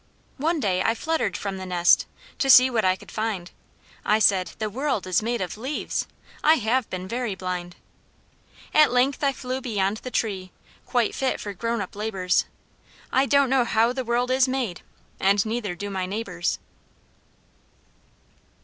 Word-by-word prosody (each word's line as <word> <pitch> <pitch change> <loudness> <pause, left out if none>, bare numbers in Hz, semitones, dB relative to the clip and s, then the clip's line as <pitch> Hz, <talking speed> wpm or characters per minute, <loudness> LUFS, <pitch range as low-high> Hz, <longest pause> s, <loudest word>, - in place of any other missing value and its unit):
One 325 +3 +1
day 185 -7 +1
I 225 - +2
fluttered 320 +7 -1
from 195 -1 -4
the 190 - -6
nest 175 -1 +4 0.3
To 270 - +1
see 255 0 +8
what 225 -3 +1
I 185 0 +3
could - - -14
find. 215 -5 -3 0.5
I 210 - +3
said, 195 -4 +3
"The 215 - -2
world 255 0 -2
is 185 +2 +1
made 235 +1 -2
of 185 +3 -4
leaves; 265 +6 -3 0.4
I 310 +1 +6
have 245 -2 0
been 185 0 -5
very 235 -1 -2
blind." 180 -1 -5 1.0
At 305 -1 +6
length 255 +4 +2
I 280 - +4
flew 260 -1 -4
beyond 210 -4 -1
the 255 - -7
tree, 195 -6 -2 0.4
Quite 240 -3 +1
fit 265 -1 -1
for 205 - -5
grown 230 +3 -2
up 195 - -7
labours. 195 -4 0 0.7
I 265 +1 +3
don't 280 -2 +3
know 265 -2 +4
how 230 +1 +2
the 260 0 -3
world 245 +1 0
is 260 0 +4
made, 255 -9 -2 0.4
And 195 +1 +3
neither 220 -4 -3
do 205 +3 -5
my 190 -1 -2
neighbours! 185 -4 -2
220 Hz, 165 wpm, -24 LUFS, 190-255 Hz, 1.0 s, see